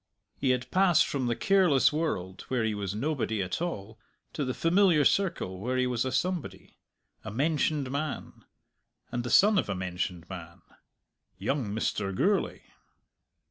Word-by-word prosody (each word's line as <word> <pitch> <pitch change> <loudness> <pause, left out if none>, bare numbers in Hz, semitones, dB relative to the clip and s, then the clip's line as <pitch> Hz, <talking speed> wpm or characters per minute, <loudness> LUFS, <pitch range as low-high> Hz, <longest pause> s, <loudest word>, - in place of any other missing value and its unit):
He 135 - -1
had 125 0 0
passed 185 -3 +4
from 130 -3 -2
the 120 - 0
careless 180 -8 +4
world 95 - -3
where 125 -3 0
he 110 -1 0
was 100 -1 -3
nobody 130 -3 -1
at 90 - -4
all 110 - -4 0.3
to 150 - -2
the 130 -1 -2
familiar 170 -3 +4
circle 170 - +1
where 125 +5 -2
he 130 - +2
was 125 -1 0
a 130 - -1
somebody, 180 -3 -3 0.4
a 110 - -6
mentioned 145 +2 0
man, 145 +1 -4 0.7
and 120 0 -2
the 120 - -4
son 200 - +6
of - - -2
a 100 - -1
mentioned 90 -1 -4
man 85 -3 -9 0.7
young 115 +6 -1
Mr. 100 -2 -2
Gourlay! 200 - +1
130 Hz, 155 wpm, -28 LUFS, 100-155 Hz, 0.7 s, son